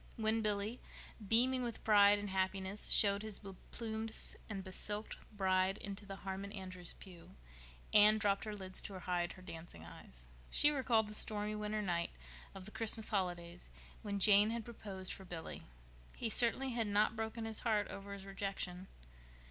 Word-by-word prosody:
When 220 0 +1
Billy, 210 +2 -1 0.5
beaming 255 +4 +4
with 240 -2 -5
pride 205 -1 +6
and 205 -1 -5
happiness, 190 +1 -1
showed 200 -1 +4
his 215 -2 0
be 195 -2 -9 0.2
plumed 225 -1 -4 0.4
and 195 -3 -4
be 185 - -9
silked 210 +3 -3 0.2
bride 190 -1 +1
into 200 0 -7
the 195 - -6
Harmon 195 +1 -6
Andrews' 185 -3 -6
pew, 175 - -13 0.6
Anne 215 +1 +7
dropped 205 -2 0
her 215 -1 -4
lids 190 -2 -4
to 195 - -6
hide 175 -1 -2
her 185 - -14
dancing 165 - -10
eyes. - - -12 0.2
She 295 - +7
recalled 240 -6 +2
the 210 - -7
stormy 210 0 +2
winter 210 0 -2
night 175 -3 -1 0.5
of 190 -1 -9
the 210 - -8
Christmas 220 0 +4
holidays 175 -3 -3 0.3
when 205 -2 -3
Jane 205 +1 +6
had 230 -1 -3
proposed 195 -5 -6
for 195 - -9
Billy. 175 -3 -7 0.5
He 225 - -3
certainly 250 +3 +2
had 230 -2 -1
not 205 +2 +2
broken 225 +1 -4
his 220 -1 -3
heart 215 -3 +1
over 200 0 -7
his 195 -1 -9
rejection. 195 -2 -5
205 Hz, 170 wpm, -36 LUFS, 190-220 Hz, 0.6 s, Anne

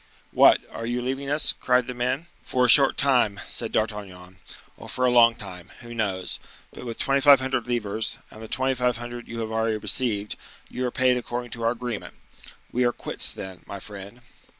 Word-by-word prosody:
"What, - - +6
are 115 - -6
you 120 +1 -1
leaving 135 +3 -3
us?" 150 +2 +3
cried 125 -1 +1
the 125 - -5
men. 125 +5 -2 0.2
"For 125 -1 +1
a - - +2
short 135 +2 +7
time," 125 -8 +2
said 115 - -3
D'Artagnan, 95 -4 -4 0.4
"or - - -11
for 125 - -1
a 125 - +3
long 120 -1 +6
time, 90 -6 -9
who 120 -1 -9
knows? 100 -5 -2 0.3
But 125 - -9
with 115 - -5
2,500 135 -3 +3
livres, 110 -3 -2
and 110 - -12
the 110 - -8
2,500 120 -2 -1
you 115 0 -5
have 110 0 -4
already 110 0 0
received, 105 0 -1 0.3
you 125 0 -2
are - - -4
paid 130 0 +2
according 120 0 -5
to 115 - -7
our 115 - +2
agreement. 120 -3 -6 0.6
We 125 - +1
are 120 - +3
quits, - - 0
then, 95 -2 -8
my 100 - -7
friend." 100 +4 -9
120 Hz, 185 wpm, -25 LUFS, 110-125 Hz, 0.6 s, short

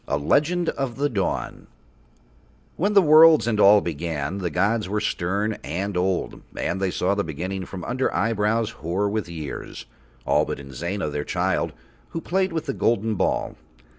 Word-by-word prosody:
A 70 - 0
LEGEND 155 - +1
OF 135 -4 -3
THE 145 +1 0
DAWN 100 -7 -3 1.1
When 200 +5 0
the 200 -2 +6
worlds 155 -1 +7
and 115 -3 0
All 105 0 +7
began 80 +1 -3
the 90 -2 -2
gods 105 +5 0
were 105 +1 0
stern 100 +4 -1
and 95 +6 -3
old 90 +1 -1 0.2
and 95 - -2
They 95 - +1
saw 90 +2 0
the 100 0 0
Beginning 90 +4 -4
from 90 -3 -7
under 130 +6 -1
eyebrows 115 0 0
hoar 90 +2 -2
with 105 -3 -2
years, 80 -4 -7 0.4
all - - +3
but - - -4
Inzana, 75 +6 -4
Their 75 0 -2
child, - - -1 0.4
who 165 - -4
played 190 +3 0
with 160 -1 -3
the 135 - -2
golden 115 -2 +1
ball. 100 - -1
100 Hz, 165 wpm, -24 LUFS, 85-120 Hz, 1.1 s, worlds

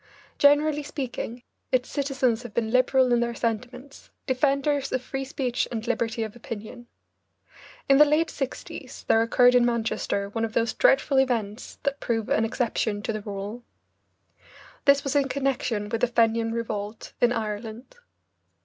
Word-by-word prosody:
Generally 290 +1 +4
speaking, 255 -4 -5 0.3
its 255 -1 +2
citizens 265 -5 0
have 240 -4 -10
been 225 -2 0
liberal 255 0 +3
in 240 - +3
their 235 0 -1
sentiments, 250 +4 -4 0.2
defenders 275 +1 +1
of 255 - +1
free 270 +1 -4
speech 260 -2 -2
and 225 -2 -4
liberty 230 -1 -1
of 220 0 -6
opinion. 235 +1 -8 1.0
In 275 0 +5
the 300 - +9
late 305 +3 +2
sixties 270 -2 -6
there 225 - +4
occurred 245 +2 +5
in 250 -1 +5
Manchester 230 -4 -1
one 225 +2 -3
of 225 -1 -2
those 230 0 +1
dreadful 270 0 +3
events 230 -4 -1
that 280 0 -1
prove 225 -2 -2
an 225 - +2
exception 220 -3 -1
to 225 - -2
the 215 - -4
rule. 205 +3 -6 1.2
This 280 0 +5
was 275 0 -2
in 280 -1 +3
connection 255 -6 -1
with 225 +2 -3
the 245 - +4
Fenian 230 -1 +2
Revolt 220 -2 -4
in 245 - +5
Ireland. 225 - -5
240 Hz, 155 wpm, -26 LUFS, 225-270 Hz, 1.2 s, the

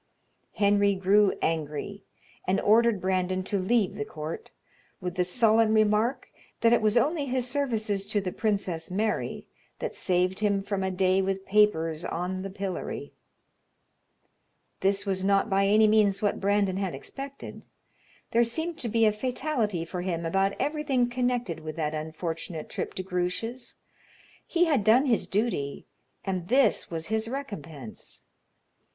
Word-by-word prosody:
Henry 200 -1 +3
grew 195 +2 +4
angry 160 +5 -2 0.4
and 190 +1 +2
ordered 225 0 +4
Brandon 185 0 0
to 200 +1 -1
leave 200 +1 +2
the 215 +1 -3
court, 160 -6 -6 0.5
with 180 -2 -4
the 180 0 +1
sullen 220 +3 +3
remark 215 +4 +2 0.3
that 230 0 +5
it 235 - +4
was 215 +2 +3
only 295 +3 +1
his 255 -1 0
services 220 -7 -1
to 210 0 +1
the 190 -2 -3
Princess 195 -7 -2
Mary 210 +4 -2 0.3
that - - -4
saved 180 0 0
him 200 -2 +1
from 200 -1 -2
a 190 - 0
day 185 0 +2
with 195 0 -2
papers 170 -6 +2
on 180 +2 -3
the 195 - -5
pillory. 195 -1 -5 1.7
This 195 +1 +1
was 190 -1 -1
not 195 +2 +2
by 195 0 +3
any 215 +2 +5
means 210 -2 +3
what 205 - 0
Brandon 200 -1 +2
had 195 -3 -2
expected. 275 0 -8 0.6
There 235 +1 +4
seemed 320 +8 -3
to 235 - -3
be 225 +1 +3
a 215 - +4
fatality 235 - -1
for 180 +1 -5
him 170 -2 -2
about 195 +4 +1
everything 275 -4 0
connected 245 -8 -1
with 155 -1 -7
that 155 -2 -2
unfortunate 160 +1 -5
trip - - -4
to 185 - -3
Grouche's. 185 +7 -3 0.7
He 350 0 +3
had 285 -10 +2
done 230 +6 +5
his 235 -6 +1
duty, 195 -10 -1 0.4
and 185 -3 -2
this 255 -1 +3
was 165 0 -5
his 220 0 0
recompense. 165 - -8
200 Hz, 150 wpm, -27 LUFS, 185-230 Hz, 1.7 s, that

